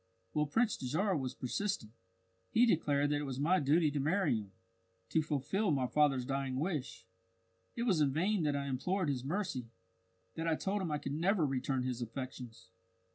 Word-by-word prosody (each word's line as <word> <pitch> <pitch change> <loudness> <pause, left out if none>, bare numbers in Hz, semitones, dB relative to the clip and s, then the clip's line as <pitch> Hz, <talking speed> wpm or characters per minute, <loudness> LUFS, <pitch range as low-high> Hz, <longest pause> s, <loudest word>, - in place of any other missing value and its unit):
Well, 150 0 +1
Prince 225 +8 +1
Dajarah 175 +10 0
was 130 -2 -4
persistent; 130 - -2 0.6
he 240 - +5
declared 145 -8 +2
that 145 - +1
it - - -3
was 135 -2 -4
my 175 +6 +3
duty 150 +2 +3
to 145 - -1
marry 155 -1 +2
him, 105 -3 -5 0.6
to 160 - +3
fulfil 155 +7 0
my 135 -4 +2
father's 135 -2 +2
dying 135 0 -2
wish. 140 - -3 0.7
It 235 - -1
was 190 -10 +2
in 140 -2 +3
vain 185 +7 +1
that 150 -2 +1
I 140 0 -1
implored 155 +7 -1
his 130 -3 -1
mercy 140 - -2 0.6
that 165 +1 -3
I 160 - +3
told 200 +5 -1
him 180 - -2
I 150 - 0
could 140 -1 -4
never 175 +2 +2
return 135 -1 -1
his 125 -1 -3
affections. 120 -4 -7
145 Hz, 185 wpm, -34 LUFS, 130-180 Hz, 0.7 s, he